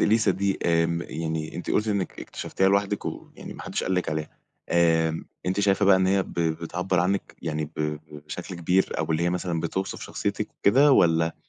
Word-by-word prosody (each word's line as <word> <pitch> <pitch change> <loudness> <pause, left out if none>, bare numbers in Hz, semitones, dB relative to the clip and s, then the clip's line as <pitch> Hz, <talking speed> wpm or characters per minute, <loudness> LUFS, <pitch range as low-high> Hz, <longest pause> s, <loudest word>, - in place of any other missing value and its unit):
إليسا 110 -1 +4
دي 95 +1 0
آمم، 85 0 +2
يعني 80 -1 -4
أنتِ 85 - -5
قلتِ 105 +1 +1
إنك 100 -3 -2
اكتشفتيها 95 0 -1
لوحدك 100 +1 +1
ويعني - - -8
ما - - -9
حدش - - -3
قال 95 - 0
لِك 90 - 0
عليها. 75 0 -4 0.3
آمم، 80 -1 +2 0.2
أنتِ 95 +2 +1
شايفة 100 0 +3
بقى 95 -1 +7
إن 95 0 +2
هي 95 0 +3
بتعبر 85 +2 -1
عنِك 95 +2 -1
يعني 80 -1 -2
ب 75 -1 -1 0.3
بشكل 90 +4 -6
كبير؟ 90 +3 +1
أو 80 - +1
ب 80 - -6
اللي 80 +2 +1
هي 85 - +2
مثلًا 90 -2 -2
بتوصف 95 +3 -3
شخصيتِك - - -3
وكده؟ 135 +7 +5
والّا 80 -5 +3
90 Hz, 190 wpm, -25 LUFS, 80-95 Hz, 0.3 s, بقى